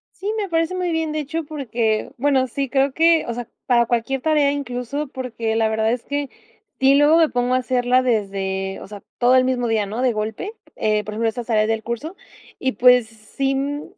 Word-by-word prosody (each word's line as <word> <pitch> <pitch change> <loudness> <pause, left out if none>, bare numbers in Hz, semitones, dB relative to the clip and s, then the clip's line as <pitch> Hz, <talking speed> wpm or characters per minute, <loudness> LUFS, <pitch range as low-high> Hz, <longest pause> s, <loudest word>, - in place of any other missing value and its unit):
Sí, 410 +2 -3
me 405 -2 -2
parece 330 +2 0
muy 360 -1 -1
bien, 320 -1 -1
de 310 - -1
hecho, 320 +3 -3
porque 235 -7 -2
bueno, 265 0 +2
sí, 275 +2 -3
creo 270 +1 +1
que 330 +1 +4
o 235 - -2
sea, 240 0 -6 0.2
para 240 -2 +4
cualquier 240 +3 -1
tarea, 300 -1 +3
incluso 280 +1 -4
porque 235 -4 -4
la 225 -1 +2
verdad 220 0 +1
es 245 0 -2
que 285 -1 -3 0.5
sí, 270 +1 +5
luego 295 +3 +5
me 325 -2 +4
pongo 245 +1 0
a - - +4
hacerla 250 0 +2
desde 195 -5 -2
o - - -9
sea, 205 -1 -10 0.2
todo 245 +1 +4
el 255 0 +5
mismo 250 -2 0
día, 220 -2 +1
¿no?, 215 +5 -4
de 255 -1 +3
golpe, 220 - -4 0.2
eh, 215 -1 0
por 210 - -7
ejemplo, 225 +1 0
estas 235 +1 -6
tareas 215 -2 +2
del 225 0 -1
curso 235 - -5 0.4
y 260 -1 -1
pues 250 +1 +5
sí, 225 +5 -3
mm 285 +2 -2
250 Hz, 215 wpm, -21 LUFS, 225-285 Hz, 0.5 s, sí